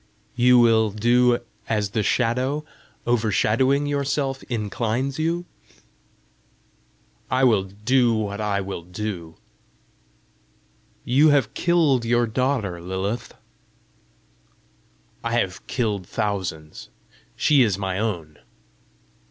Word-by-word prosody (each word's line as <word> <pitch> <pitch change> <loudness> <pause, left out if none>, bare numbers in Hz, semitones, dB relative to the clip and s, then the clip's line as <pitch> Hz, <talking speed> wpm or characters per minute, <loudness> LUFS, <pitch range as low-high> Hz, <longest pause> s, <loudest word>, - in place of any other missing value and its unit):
"You 125 0 +5
will 115 -2 +4
do 120 +3 +2 0.3
as 105 -3 0
the 110 - 0
Shadow, 130 +7 0 0.4
overshadowing 120 +4 +2
your 145 -1 -1
Self 135 -1 -2
inclines 120 +4 -2
you?" 170 +2 -1 1.8
"I 130 +1 +1
will 110 -7 +4
do 115 +6 +1
what 105 -1 -3
I 100 -1 0
will 95 -2 -5
to 90 - -22
do." 90 -5 -5 1.7
"You 140 +5 +4
have 140 -7 +2
killed 160 -8 +2
your 120 +1 +2
daughter, 110 -7 -1
Lilith!" 95 +6 -4 1.9
"I 115 0 -2
have 95 -6 -1
killed 105 -7 -2
thousands. 95 -8 -4 0.5
She 145 -3 +4
is 105 -6 +2
my 95 -1 -2
own!" 85 -9 -4
115 Hz, 105 wpm, -23 LUFS, 100-130 Hz, 1.9 s, You